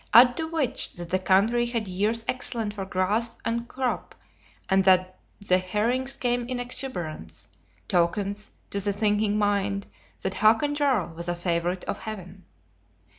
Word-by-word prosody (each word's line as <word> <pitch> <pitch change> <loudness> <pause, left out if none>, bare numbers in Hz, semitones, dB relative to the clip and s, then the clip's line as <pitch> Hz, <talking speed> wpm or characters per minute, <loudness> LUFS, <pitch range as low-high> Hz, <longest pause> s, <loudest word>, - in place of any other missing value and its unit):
Add 245 +1 +9
to 320 - -2
which 320 -6 -2
that 175 -1 -8
the 185 - +2
country 215 +6 +3
had 230 -3 -2
years 210 +5 0
excellent 240 -4 -2
for 195 -2 -5
grass 205 +5 +1
and 235 +1 -1
crop, 255 0 -3 0.5
and 190 -1 +3
that 185 -1 +3 0.3
the 185 0 +5
herrings 235 +8 0
came 245 -1 0
in 250 -1 -3
exuberance; 175 - -5 0.4
tokens, 200 +4 0 0.2
to 200 - 0
the 200 +1 0
thinking 210 0 +1
mind, 200 -1 0 0.4
that 190 - -1
Hakon 225 +9 +3
Jarl 265 - +1
was 170 +1 -5
a 175 - 0
favorite 175 +1 -1
of - - -4
Heaven. 190 -3 -8
205 Hz, 150 wpm, -26 LUFS, 185-240 Hz, 0.5 s, Add